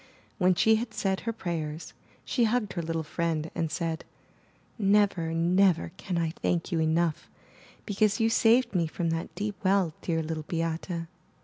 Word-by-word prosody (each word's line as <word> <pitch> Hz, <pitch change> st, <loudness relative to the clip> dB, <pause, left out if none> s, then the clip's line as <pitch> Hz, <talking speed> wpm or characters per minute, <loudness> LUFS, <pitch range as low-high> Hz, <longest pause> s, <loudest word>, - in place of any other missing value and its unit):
When 185 Hz, -1 st, +4 dB
she 220 Hz, +4 st, +4 dB
had 225 Hz, 0 st, -5 dB
said 190 Hz, -1 st, 0 dB
her 230 Hz, -, -2 dB
prayers, 165 Hz, -6 st, -4 dB, 0.3 s
she 240 Hz, -3 st, +2 dB
hugged 220 Hz, -2 st, 0 dB
her 175 Hz, -, -2 dB
little 165 Hz, 0 st, -2 dB
friend 160 Hz, 0 st, -2 dB
and 165 Hz, -, -1 dB
said, 165 Hz, -1 st, -2 dB, 0.8 s
Never, 200 Hz, -5 st, +3 dB
never 170 Hz, -, +3 dB
can 180 Hz, -2 st, -3 dB
I 165 Hz, -1 st, 0 dB
thank 170 Hz, +2 st, 0 dB
you 170 Hz, -, +1 dB
enough, 160 Hz, 0 st, +1 dB, 0.6 s
because 205 Hz, -1 st, +1 dB
you 225 Hz, -, +3 dB
saved 230 Hz, +2 st, +4 dB
me 170 Hz, -3 st, +1 dB
from 165 Hz, +1 st, -2 dB
that 165 Hz, 0 st, -4 dB
deep 205 Hz, -2 st, -4 dB
well, 190 Hz, -4 st, +2 dB
dear 165 Hz, -2 st, -1 dB
Little 155 Hz, -1 st, -4 dB
Beate. 165 Hz, +1 st, -2 dB
175 Hz, 165 wpm, -28 LUFS, 165-205 Hz, 0.8 s, When